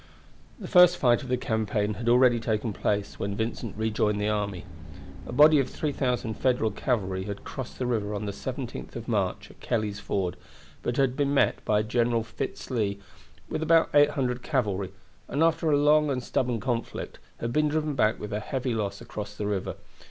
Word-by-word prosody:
The -, -, -7 dB
first 180 Hz, -2 st, +7 dB
fight 120 Hz, -1 st, +3 dB
of 130 Hz, -, -8 dB
the 125 Hz, -, +2 dB
campaign 110 Hz, -3 st, -1 dB
had 115 Hz, +4 st, -2 dB
already 120 Hz, -1 st, +5 dB
taken 110 Hz, 0 st, -1 dB
place 100 Hz, +1 st, -2 dB
when 100 Hz, 0 st, -2 dB
Vincent 110 Hz, -1 st, -3 dB
rejoined 110 Hz, -1 st, 0 dB
the 105 Hz, +1 st, 0 dB
army. 100 Hz, -4 st, -2 dB, 0.6 s
A -, -, -6 dB
body 150 Hz, +4 st, +7 dB
of 130 Hz, -2 st, 0 dB
3,000 125 Hz, -6 st, -1 dB
Federal 125 Hz, -2 st, +1 dB
cavalry 95 Hz, -5 st, -1 dB
had 100 Hz, -1 st, -6 dB
crossed 130 Hz, -3 st, -7 dB
the 130 Hz, -, -2 dB
river 105 Hz, -4 st, -1 dB
on 105 Hz, -, -3 dB
the 100 Hz, -, -2 dB
17th 125 Hz, +4 st, -6 dB
of 115 Hz, -1 st, -6 dB
March 100 Hz, -2 st, -1 dB
at -, -, -21 dB
Kelley's 110 Hz, -4 st, -2 dB
Ford, 95 Hz, -3 st, -2 dB, 0.4 s
but 120 Hz, -, -2 dB
had 135 Hz, -2 st, +2 dB
been 140 Hz, 0 st, +1 dB
met -, -, +2 dB
by 105 Hz, 0 st, +2 dB
General 115 Hz, +1 st, +1 dB
Fitz 115 Hz, -, -6 dB
Lee 105 Hz, -5 st, 0 dB, 0.5 s
with -, -, -3 dB
about 165 Hz, +1 st, +4 dB
800 140 Hz, -4 st, +3 dB
cavalry, 105 Hz, -, -1 dB, 0.4 s
and 150 Hz, -, +1 dB
after 165 Hz, -1 st, +2 dB
a 145 Hz, -, +4 dB
long 150 Hz, +1 st, +4 dB
and 130 Hz, -2 st, -1 dB
stubborn 120 Hz, -2 st, 0 dB
conflict 120 Hz, -1 st, -3 dB, 0.2 s
had 115 Hz, 0 st, -3 dB
been 150 Hz, +2 st, +3 dB
driven 155 Hz, 0 st, 0 dB
back 110 Hz, -4 st, +2 dB
with 105 Hz, -, -6 dB
heavy 125 Hz, +4 st, -2 dB
loss 100 Hz, -2 st, -3 dB
across 105 Hz, -3 st, -7 dB
the 105 Hz, -, -3 dB
river. 100 Hz, -2 st, -2 dB
120 Hz, 185 wpm, -27 LUFS, 105-130 Hz, 0.6 s, first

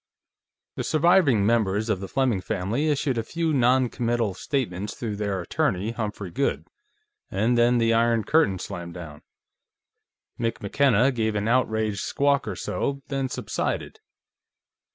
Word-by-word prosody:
The -, -, -2 dB
surviving 155 Hz, -, +3 dB
members 110 Hz, -1 st, +1 dB
of 110 Hz, -4 st, 0 dB
the 95 Hz, -, -6 dB
Fleming 125 Hz, -5 st, 0 dB
family 110 Hz, -, -1 dB
issued 140 Hz, -4 st, 0 dB
a -, -, -1 dB
few 165 Hz, +5 st, -1 dB
noncommittal 120 Hz, -4 st, +1 dB
statements 105 Hz, -4 st, -3 dB
through 110 Hz, -4 st, -4 dB
their 100 Hz, -2 st, -2 dB
attorney, 95 Hz, +4 st, -1 dB
Humphrey 105 Hz, -5 st, -5 dB
Goode, -, -, -1 dB, 0.6 s
and 110 Hz, +6 st, +1 dB
then 120 Hz, +1 st, +4 dB
the 115 Hz, -1 st, +3 dB
Iron 115 Hz, -1 st, +2 dB
Curtain 155 Hz, -11 st, +2 dB
slammed 85 Hz, -1 st, -7 dB
down. 75 Hz, -4 st, -9 dB, 1.2 s
Mick 115 Hz, -1 st, -1 dB
McKenna 130 Hz, +3 st, +3 dB
gave 110 Hz, -3 st, -1 dB
an 105 Hz, +1 st, -1 dB
outraged 110 Hz, -4 st, +1 dB
squawk 140 Hz, +4 st, +1 dB
or -, -, -3 dB
so, 140 Hz, 0 st, -3 dB
then 135 Hz, -2 st, -1 dB
subsided. -, -, -3 dB
115 Hz, 135 wpm, -25 LUFS, 100-130 Hz, 1.2 s, then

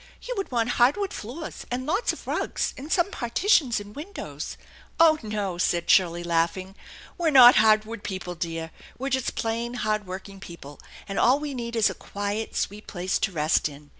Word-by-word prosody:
You -, -, -4 dB
would 390 Hz, -, -3 dB
want 235 Hz, -3 st, 0 dB
hardwood 370 Hz, +12 st, +3 dB
floors, 270 Hz, +9 st, -7 dB
and 250 Hz, +1 st, -3 dB
lots 380 Hz, -, +1 dB
of -, -, -10 dB
rugs, -, -, -2 dB
and 285 Hz, +5 st, -9 dB
some 370 Hz, +2 st, +2 dB
partitions 250 Hz, -, +2 dB
and 205 Hz, 0 st, -11 dB
windows 355 Hz, +9 st, -7 dB
" -, -, -22 dB
" -, -, -32 dB
Oh, 320 Hz, -2 st, +6 dB
no," 205 Hz, -5 st, -3 dB
said 175 Hz, -1 st, +1 dB
Shirley, 175 Hz, -2 st, +3 dB
laughing. 170 Hz, +3 st, -1 dB, 0.2 s
" -, -, -18 dB
We're 335 Hz, -2 st, +2 dB
not 255 Hz, -4 st, +9 dB
hardwood 215 Hz, 0 st, +3 dB
people, 185 Hz, -3 st, -5 dB
dear; 165 Hz, -1 st, -4 dB, 0.3 s
we're 270 Hz, +2 st, -3 dB
just 260 Hz, -1 st, -1 dB
plain 230 Hz, +2 st, -2 dB
hard 215 Hz, -4 st, -1 dB
working 195 Hz, +1 st, -8 dB
people; 170 Hz, -6 st, -11 dB, 0.3 s
and 195 Hz, -, -3 dB
all 255 Hz, +3 st, +5 dB
Ire 290 Hz, -, -4 dB
need 235 Hz, -2 st, -5 dB
is 225 Hz, -2 st, +3 dB
a -, -, -6 dB
quiet, 205 Hz, +2 st, -4 dB
sweet 210 Hz, +2 st, -3 dB
place 180 Hz, 0 st, -2 dB
to -, -, 0 dB
rest 155 Hz, -2 st, +1 dB
in. 145 Hz, 0 st, -14 dB
215 Hz, 195 wpm, -25 LUFS, 185-260 Hz, 0.3 s, not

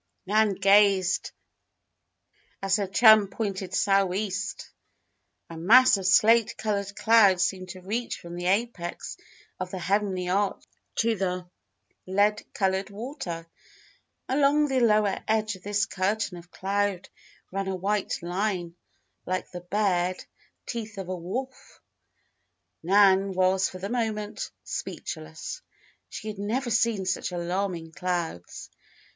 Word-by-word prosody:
Nan 210 Hz, +1 st, +2 dB
gazed 195 Hz, -1 st, +4 dB, 1.3 s
as 195 Hz, 0 st, +1 dB
her 200 Hz, -2 st, -1 dB
chum 215 Hz, +1 st, +6 dB
pointed 195 Hz, -2 st, -4 dB
"sou'east." 195 Hz, +1 st, 0 dB, 0.8 s
A 165 Hz, -, -9 dB
mass 225 Hz, +11 st, +6 dB
of 190 Hz, -2 st, -2 dB
slate 225 Hz, +3 st, +4 dB
colored 200 Hz, -2 st, -2 dB
clouds 200 Hz, -5 st, +5 dB
seemed 185 Hz, -1 st, -4 dB
to 185 Hz, +1 st, -9 dB
reach 225 Hz, +6 st, -3 dB
from 170 Hz, 0 st, -9 dB
the 175 Hz, 0 st, -3 dB
apex 195 Hz, -3 st, -2 dB, 0.4 s
of 185 Hz, -1 st, -4 dB
the 190 Hz, -, -5 dB
heavenly 185 Hz, 0 st, 0 dB
arch 195 Hz, +2 st, 0 dB, 0.3 s
to 230 Hz, 0 st, +2 dB
the 180 Hz, -2 st, -2 dB, 0.6 s
lead 205 Hz, +3 st, +2 dB
colored 190 Hz, 0 st, 0 dB
water. 200 Hz, -, -6 dB, 0.8 s
Along 290 Hz, +2 st, +3 dB
the 265 Hz, -2 st, +1 dB
lower 210 Hz, -4 st, +3 dB
edge 220 Hz, -1 st, +1 dB
of 185 Hz, -, -15 dB
this 205 Hz, +2 st, 0 dB
curtain 200 Hz, +1 st, -1 dB
of 175 Hz, +1 st, -16 dB
cloud 195 Hz, 0 st, -1 dB, 0.4 s
ran 195 Hz, +1 st, -3 dB
a 190 Hz, -, -1 dB
white 195 Hz, 0 st, -2 dB
line, 175 Hz, -1 st, -2 dB, 0.5 s
like 185 Hz, 0 st, -3 dB
the 180 Hz, -, -7 dB
bared 185 Hz, -1 st, 0 dB, 0.4 s
teeth 220 Hz, -4 st, -6 dB
of 190 Hz, -2 st, -6 dB
a 185 Hz, -, -2 dB
wolf! 240 Hz, +10 st, -6 dB, 1.0 s
Nan 195 Hz, +1 st, +4 dB
was 185 Hz, +1 st, +2 dB
for 185 Hz, -, -9 dB
the 190 Hz, +2 st, -5 dB
moment 215 Hz, -2 st, -3 dB
speechless. 80 Hz, 0 st, -6 dB, 0.5 s
She 215 Hz, -, -7 dB
had 210 Hz, -2 st, -6 dB
never 240 Hz, +5 st, -2 dB
seen 225 Hz, -3 st, +1 dB
such 185 Hz, 0 st, -1 dB
alarming 175 Hz, -1 st, -3 dB
clouds. 170 Hz, -, -4 dB
195 Hz, 125 wpm, -26 LUFS, 185-215 Hz, 1.3 s, chum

